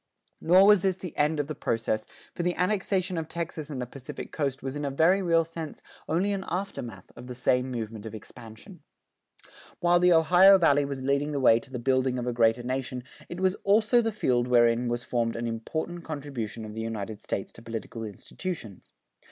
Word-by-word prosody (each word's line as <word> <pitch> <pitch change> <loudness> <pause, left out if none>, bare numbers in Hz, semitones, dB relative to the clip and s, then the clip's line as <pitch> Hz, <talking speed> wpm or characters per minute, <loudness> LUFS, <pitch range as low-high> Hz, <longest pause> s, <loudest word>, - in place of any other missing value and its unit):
Nor 185 +4 +6
was 205 -2 +6
this 190 -1 +1
the 180 -3 -8
end 150 +1 +1
of 145 - 0
the 155 - -5
process, 115 -5 -2 0.3
for - - -4
the 175 0 0
annexation 185 -1 0
of 160 - -5
Texas 160 -2 -5
and 140 -4 -5
the 125 - -2
Pacific 130 +1 -9
Coast 140 -3 -2
was 135 +1 -4
in 145 - -4
a 140 - -1
very 165 +8 +3
real 165 -2 +3
sense 165 -1 -8 0.3
only 185 +6 +1
an 195 -1 -3
aftermath 180 - -5
of 125 - -10
the 125 - -7
same 125 +1 +1
movement 110 -3 -5
of 110 - -7
expansion. 110 +1 -12 1.0
While 175 0 +4
the 180 0 +5
Ohio 180 +4 +7
Valley 145 -5 +3
was 140 -2 -5
leading 140 +2 0
the 140 - -1
way 115 -3 +5
to 120 - -15
the 130 - -5
building 130 +1 +1
of 120 - -3
a 125 - -1
greater 115 0 +3
nation, 125 0 -3 0.3
it 175 - -6
was 185 -1 +3
also 215 +4 +4
the 225 -1 -1
field 125 - +1
wherein 120 0 +3
was 120 +1 -2
formed 115 -2 -1
an 115 - -3
important 160 +9 -4
contribution 135 -8 -5
of 105 - -8
the 110 - -5
United 110 -2 -5
States 95 - -4
to - - -12
political 115 0 -6
institutions. 110 - -7
140 Hz, 200 wpm, -27 LUFS, 120-175 Hz, 1.0 s, Ohio